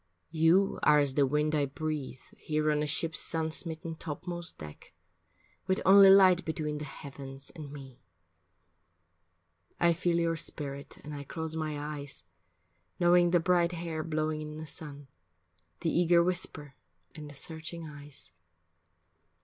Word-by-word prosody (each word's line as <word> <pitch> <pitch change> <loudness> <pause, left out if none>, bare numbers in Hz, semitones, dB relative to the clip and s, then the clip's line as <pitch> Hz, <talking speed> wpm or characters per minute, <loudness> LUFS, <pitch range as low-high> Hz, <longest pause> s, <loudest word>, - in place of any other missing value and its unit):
You 170 +5 +3
are 150 0 +5
as 145 -2 +3
the 140 0 +3
wind 150 +2 +1
I 145 -2 +1
breathe 145 -2 -4
Here 155 0 0
on 150 - +1
the 150 - -1
ship's 160 +2 0
sun 160 -1 -1
smitten 160 0 -1
topmost 170 +2 -6
deck, 75 -1 -11 0.7
With 190 - +1
only 195 0 +9
light 190 -2 +7
between 150 -2 -3
the 150 - -5
heavens 135 -1 -9
and 150 -4 -9
me. 135 -3 -11 1.8
I 170 0 +4
feel 170 0 0
your 165 -1 +1
spirit 140 -3 -5
and 150 - -8
I 145 -1 -6
close 160 +3 -5
my 155 -2 -3
eyes, 145 - -7 0.8
Knowing 175 0 +5
the 175 0 +4
bright 175 0 +2
hair 165 -2 -4
blowing 155 -1 -2
in 150 0 -7
the 155 - -6
sun, 145 -3 -7 0.7
The 165 - 0
eager 170 0 +4
whisper 170 -5 -3 0.4
and 150 -2 -9
the 145 - -12
searching 160 +3 -6
eyes. 145 - -12
155 Hz, 145 wpm, -30 LUFS, 145-170 Hz, 1.8 s, only